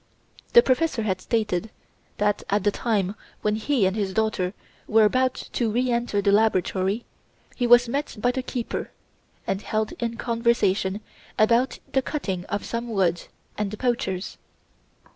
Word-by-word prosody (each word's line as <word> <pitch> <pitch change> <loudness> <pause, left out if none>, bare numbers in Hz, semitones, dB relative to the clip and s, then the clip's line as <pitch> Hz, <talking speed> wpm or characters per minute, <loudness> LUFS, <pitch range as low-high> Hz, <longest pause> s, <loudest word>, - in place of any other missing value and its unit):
The 475 - +9
professor 260 -2 +1
had 190 -3 -1
stated 215 -3 -1 0.5
that 210 0 +1
at 205 -1 +1
the 205 - +3
time 200 -4 0 0.3
when 210 0 +2
he 235 -1 +1
and 190 +1 +1
his 200 -3 -2
daughter 210 -4 0 0.3
were 220 0 +5
about 255 +4 +2 0.2
to 235 -3 +1
re 245 +3 +1
enter 235 -4 0
the 200 - +4
laboratory 200 0 +1 0.5
he 245 - 0
was 240 0 +7
met 280 +5 -2
by 245 +3 +2
the 260 - -2
keeper 245 -2 -4 0.6
and 195 - -1
held 215 0 -1
in 230 -1 -2
conversation 230 -5 +1 0.4
about 235 +4 +3 0.2
the 265 - +3
cutting 195 - -3
of 205 0 -3
some 235 +1 -4
wood 185 -5 0 0.3
and 210 -1 0
the 215 - -7
poachers. 210 -6 -2
220 Hz, 155 wpm, -25 LUFS, 200-240 Hz, 0.6 s, The